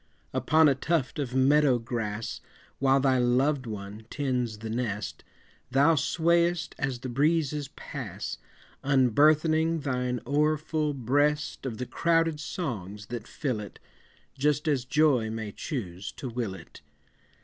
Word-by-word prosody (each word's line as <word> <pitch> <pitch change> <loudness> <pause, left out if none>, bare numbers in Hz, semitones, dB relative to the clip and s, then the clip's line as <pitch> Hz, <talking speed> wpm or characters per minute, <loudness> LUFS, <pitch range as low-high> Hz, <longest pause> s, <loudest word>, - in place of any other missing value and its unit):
Upon 155 +5 +4
a 140 - +5
tuft 135 -3 -1
of 130 -3 -3
meadow 135 0 +4
grass, 115 -2 -4 0.4
While 135 0 +4
thy 130 -1 +3
loved 130 +2 +2
one 105 +1 -7
tends 125 -6 -1
the 110 +1 -7
nest, 110 -4 -3 0.5
Thou 140 +5 +4
swayest 170 +2 +1
as 130 -3 -2
the 130 - -4
breezes 150 +2 +1
pass, - - -6 0.4
Unburthening 155 +5 +3
thine 125 -3 -1
o'erfull 150 +2 +1
breast 145 +3 0
Of 115 -4 -5
the 125 - -3
crowded 165 +1 +1
songs 105 - -5
that 115 -2 -5
fill 130 -8 -2
it, 105 - -9 0.6
Just 150 +2 +1
as 135 -5 +1
joy 135 -4 +3
may 110 -1 -4
choose 100 - -5
to 135 - -6
will 115 -5 -3
it. 90 - -13
135 Hz, 130 wpm, -28 LUFS, 120-150 Hz, 0.6 s, a